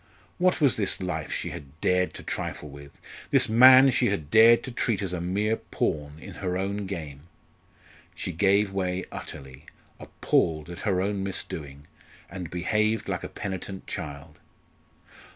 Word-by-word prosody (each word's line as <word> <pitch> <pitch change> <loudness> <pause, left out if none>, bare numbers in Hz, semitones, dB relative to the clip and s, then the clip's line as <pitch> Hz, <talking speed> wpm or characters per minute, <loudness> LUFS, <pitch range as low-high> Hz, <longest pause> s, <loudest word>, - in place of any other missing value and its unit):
What 180 0 +2
was 140 -5 +3
this 100 -3 +1
life 90 -1 -4
she - - -3
had 75 +2 -11
dared 90 +1 +1
to - - -9
trifle 75 - -5
with 70 0 -13 0.3
this - - +4
man 130 +4 +8
she - - +2
had 80 -7 -3
dared 115 +1 +7
to 130 - -6
treat 115 -3 0
as 95 -2 -2
a 90 - -3
mere 105 +5 0
pawn 75 -1 -3
in - - -10
her 90 -1 -1
own 100 +1 -3
game? 75 -5 -7 0.9
She - - -4
gave 100 +3 +2
way 95 -1 -2
utterly, 65 -1 -9 0.3
appalled 80 0 0
at 85 - -8
her 95 -1 +1
own 100 -1 -2
misdoing, 75 -7 -6 0.5
and 90 -3 -6
behaved 105 +5 0
like - - -3
a - - -5
penitent 95 0 -6
child. 75 +1 -7
95 Hz, 155 wpm, -26 LUFS, 80-105 Hz, 0.9 s, man